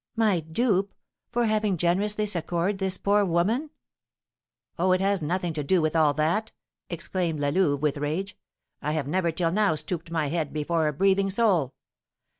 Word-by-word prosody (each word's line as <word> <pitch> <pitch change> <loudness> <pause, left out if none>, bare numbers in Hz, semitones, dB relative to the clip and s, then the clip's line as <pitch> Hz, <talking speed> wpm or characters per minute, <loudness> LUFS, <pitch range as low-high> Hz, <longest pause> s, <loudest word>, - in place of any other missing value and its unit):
"My 215 -6 +2
dupe! 195 +4 0 0.3
for 240 0 0
having 215 -3 +1
generously 205 +5 +1
succoured 175 +1 -1
this 190 -1 -1
poor 205 +1 +2
woman?" 200 - 0 1.1
"Oh, 185 +1 +3
it 185 - +2
has 195 -1 +1
nothing 175 +2 -1
to 150 -1 -3
do 180 +6 +2
with 155 0 0
all 155 -3 +3
that," 170 +9 0 0.4
exclaimed 170 -1 -2
La 145 0 +1
Louve, 145 -3 +1
with 150 -1 +1
rage. 160 +7 -3 0.5
"I 150 - -1
have 150 -4 -2
never 170 +2 0
till 165 0 0
now 205 -3 +2
stooped 165 +2 -4
my 160 -3 -1
head 160 -2 -2
before 155 +1 0
a 150 - -1
breathing 195 +4 +2
soul. 190 - +1
175 Hz, 170 wpm, -26 LUFS, 155-200 Hz, 1.1 s, Oh